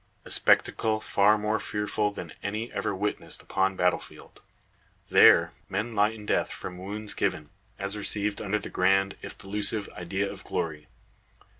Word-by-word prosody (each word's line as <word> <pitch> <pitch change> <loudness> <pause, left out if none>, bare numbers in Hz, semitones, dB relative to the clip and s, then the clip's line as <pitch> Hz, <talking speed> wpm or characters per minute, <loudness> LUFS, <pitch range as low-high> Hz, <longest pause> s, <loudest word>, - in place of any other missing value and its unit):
A - - -10
spectacle 110 -1 +3
far 105 0 +3
more 105 +1 0
fearful 105 0 -1
than 100 - -8
any 110 +3 -4
ever 100 - -2
witnessed 105 +2 -4
upon 95 0 0
battle 90 -1 +2
field. - - -13 0.7
There - - +7 0.2
men 105 +5 -2
lie 105 0 +4
in 110 -1 -9
death - - 0
from 90 -1 -7
wounds 105 +3 -2
given, 75 -1 -2 0.3
as 100 +1 -3
received 105 0 0
under 105 0 0
the - - -7
grand, 95 +1 +2
if - - -9
delusive, 105 +1 0
idea 95 +3 -3
of - - -8
glory. 75 -2 -3
100 Hz, 155 wpm, -27 LUFS, 95-105 Hz, 0.7 s, There